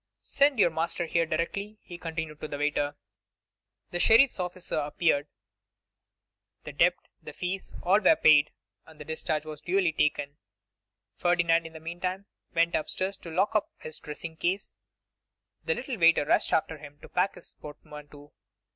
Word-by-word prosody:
'Send 280 Hz, -1 st, +2 dB
your 190 Hz, -5 st, +4 dB
master 165 Hz, +2 st, -1 dB
here 165 Hz, 0 st, +1 dB
directly,' 200 Hz, +7 st, -3 dB
he 175 Hz, -, -10 dB
continued 160 Hz, -3 st, -5 dB
to 155 Hz, -, -4 dB
the 145 Hz, -, -5 dB
waiter. 145 Hz, 0 st, 0 dB, 1.0 s
The 175 Hz, -, -2 dB
sheriff's 230 Hz, +4 st, +5 dB
officer 180 Hz, 0 st, -4 dB
appeared; 150 Hz, 0 st, +1 dB, 1.4 s
the -, -, -8 dB
debt, -, -, +4 dB, 0.3 s
the -, -, -9 dB
fees, 185 Hz, +2 st, -4 dB
all 190 Hz, +4 st, +4 dB
were 320 Hz, -, +5 dB
paid, 155 Hz, -, +5 dB, 0.4 s
and 160 Hz, -1 st, -16 dB
the 150 Hz, -, -8 dB
discharge 155 Hz, -1 st, -2 dB, 0.2 s
duly 180 Hz, 0 st, +1 dB
taken. 145 Hz, -2 st, 0 dB, 0.8 s
Ferdinand 170 Hz, -1 st, +2 dB
in 165 Hz, -, -14 dB
the 160 Hz, -, -9 dB
meantime 180 Hz, +4 st, -4 dB, 0.3 s
went 170 Hz, 0 st, +3 dB
up 155 Hz, -, -1 dB
stairs 190 Hz, +1 st, -2 dB
to 170 Hz, -, -10 dB
lock 190 Hz, +6 st, +1 dB
up 215 Hz, -, +1 dB
his 155 Hz, -, -9 dB
dressing 160 Hz, +2 st, -7 dB
case; 185 Hz, +4 st, -2 dB, 0.9 s
the 485 Hz, -, +1 dB
little 255 Hz, -, -5 dB
waiter 165 Hz, -3 st, +5 dB
rushed -, -, +2 dB
after 160 Hz, -1 st, 0 dB
him 145 Hz, -1 st, -12 dB
to -, -, -9 dB
pack 185 Hz, +2 st, 0 dB
his -, -, -10 dB
portmanteau. 150 Hz, -1 st, -12 dB
165 Hz, 155 wpm, -28 LUFS, 150-185 Hz, 1.4 s, sheriff's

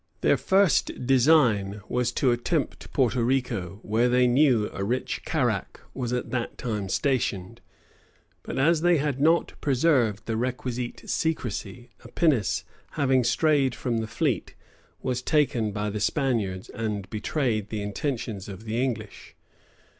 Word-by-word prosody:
Their -, -, +4 dB
first 190 Hz, -9 st, +2 dB
design 120 Hz, -7 st, +3 dB
was 125 Hz, -1 st, 0 dB
to 130 Hz, 0 st, +2 dB
attempt 135 Hz, +6 st, -2 dB
Porto 125 Hz, -2 st, +1 dB
Rico, 115 Hz, -8 st, -1 dB
where, 115 Hz, +3 st, +2 dB
they 125 Hz, +1 st, +4 dB
knew, 125 Hz, -4 st, +4 dB
a 100 Hz, -, -3 dB
rich 125 Hz, +6 st, -2 dB
carrack -, -, -1 dB
was 125 Hz, -3 st, -3 dB
at 125 Hz, 0 st, -2 dB
that 125 Hz, -2 st, -3 dB
time 105 Hz, -6 st, -3 dB
stationed; 115 Hz, -4 st, -1 dB, 0.8 s
but -, -, -6 dB
as 155 Hz, +4 st, +3 dB
they 175 Hz, 0 st, +4 dB
had 140 Hz, -2 st, -1 dB
not 165 Hz, +3 st, +3 dB
preserved 125 Hz, -7 st, +2 dB
the 115 Hz, -, -2 dB
requisite 125 Hz, 0 st, -3 dB
secrecy, 120 Hz, -6 st, -3 dB
a -, -, -11 dB
pinnace, 125 Hz, -, +1 dB, 0.3 s
having 130 Hz, -3 st, +2 dB
strayed 135 Hz, 0 st, +2 dB
from 120 Hz, -3 st, -1 dB
the 110 Hz, -, -3 dB
fleet, -, -, -1 dB, 0.5 s
was 125 Hz, -1 st, -1 dB
taken 125 Hz, -8 st, +1 dB
by 105 Hz, +1 st, -2 dB
the 105 Hz, -, -3 dB
Spaniards, 105 Hz, -7 st, -1 dB
and 105 Hz, -4 st, -4 dB
betrayed 110 Hz, -2 st, -1 dB
the 105 Hz, -2 st, -3 dB
intentions 105 Hz, -2 st, -4 dB
of 95 Hz, +2 st, -9 dB
the 115 Hz, +2 st, -1 dB
English. 110 Hz, -5 st, -5 dB
120 Hz, 140 wpm, -26 LUFS, 110-135 Hz, 0.8 s, Their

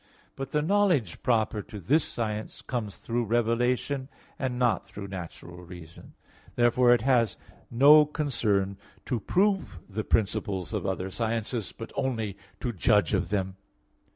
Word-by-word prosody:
But 135 Hz, -1 st, -5 dB
the 150 Hz, 0 st, +1 dB
knowledge 175 Hz, -, +2 dB
proper 110 Hz, -3 st, +1 dB
to 105 Hz, +1 st, -9 dB
this 145 Hz, -, +2 dB
science 110 Hz, -2 st, -4 dB
comes 115 Hz, -6 st, -4 dB
through 120 Hz, 0 st, -2 dB
revelation 120 Hz, +4 st, 0 dB, 0.3 s
and 130 Hz, -3 st, -2 dB
not 120 Hz, -5 st, +2 dB
through 100 Hz, -1 st, -9 dB
natural 90 Hz, -1 st, -8 dB
reason. 85 Hz, -2 st, -12 dB, 0.4 s
Therefore 120 Hz, +1 st, +4 dB
it 120 Hz, -2 st, +4 dB
has 120 Hz, -4 st, +2 dB, 0.3 s
no 145 Hz, +5 st, +7 dB
concern 105 Hz, -11 st, 0 dB, 0.3 s
to 125 Hz, -4 st, -1 dB
prove 190 Hz, -, +1 dB
the 110 Hz, +1 st, -4 dB
principles 100 Hz, -4 st, -1 dB
of -, -, -2 dB
other 95 Hz, 0 st, -2 dB
sciences, 115 Hz, 0 st, -2 dB
but 115 Hz, -, -9 dB
only 115 Hz, -7 st, -2 dB, 0.3 s
to 120 Hz, -2 st, -2 dB
judge 105 Hz, -1 st, +3 dB
of 95 Hz, -3 st, 0 dB
them. 95 Hz, -2 st, -2 dB
115 Hz, 140 wpm, -28 LUFS, 100-130 Hz, 0.4 s, no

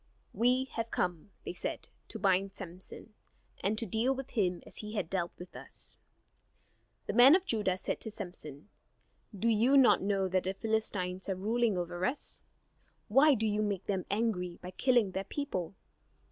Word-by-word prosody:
"We 250 Hz, +2 st, +3 dB
have 230 Hz, 0 st, -1 dB
come," 180 Hz, -1 st, -2 dB, 0.2 s
they -, -, -4 dB
said, -, -, -4 dB, 0.2 s
"to -, -, -7 dB
bind 195 Hz, 0 st, +1 dB
Samson, 185 Hz, +3 st, -9 dB, 0.5 s
and 205 Hz, +3 st, +1 dB
to 230 Hz, -, -1 dB
deal 225 Hz, +6 st, +1 dB
with 270 Hz, 0 st, -7 dB
him 180 Hz, -6 st, 0 dB
as -, -, -8 dB
he 210 Hz, 0 st, -6 dB
has 200 Hz, -5 st, 0 dB
dealt 175 Hz, 0 st, -2 dB
with 180 Hz, -, -11 dB
us." -, -, -8 dB, 1.1 s
The -, -, -3 dB
men 250 Hz, +6 st, +9 dB
of 375 Hz, 0 st, +1 dB
Judah 210 Hz, -, 0 dB
said -, -, -3 dB
to -, -, -4 dB
Samson: 175 Hz, -6 st, -7 dB, 0.7 s
"Do 225 Hz, -, 0 dB
you 230 Hz, +5 st, +4 dB
not 235 Hz, -8 st, +6 dB
know 195 Hz, -1 st, +1 dB
that 185 Hz, 0 st, 0 dB
the 190 Hz, +1 st, -1 dB
Philistines 195 Hz, -4 st, -2 dB
are 190 Hz, -, 0 dB
ruling 220 Hz, +2 st, +1 dB
over 175 Hz, 0 st, -3 dB
us? 260 Hz, +8 st, -1 dB, 0.7 s
Why 275 Hz, +6 st, +6 dB
do 220 Hz, -1 st, -1 dB
you 210 Hz, 0 st, +1 dB
make 200 Hz, -3 st, -1 dB
them 190 Hz, -3 st, -2 dB
angry 195 Hz, -5 st, -1 dB
by 180 Hz, -, -8 dB
killing 240 Hz, -3 st, +2 dB
their 190 Hz, +1 st, -2 dB
people? 195 Hz, -, -4 dB
205 Hz, 175 wpm, -32 LUFS, 185-230 Hz, 1.1 s, men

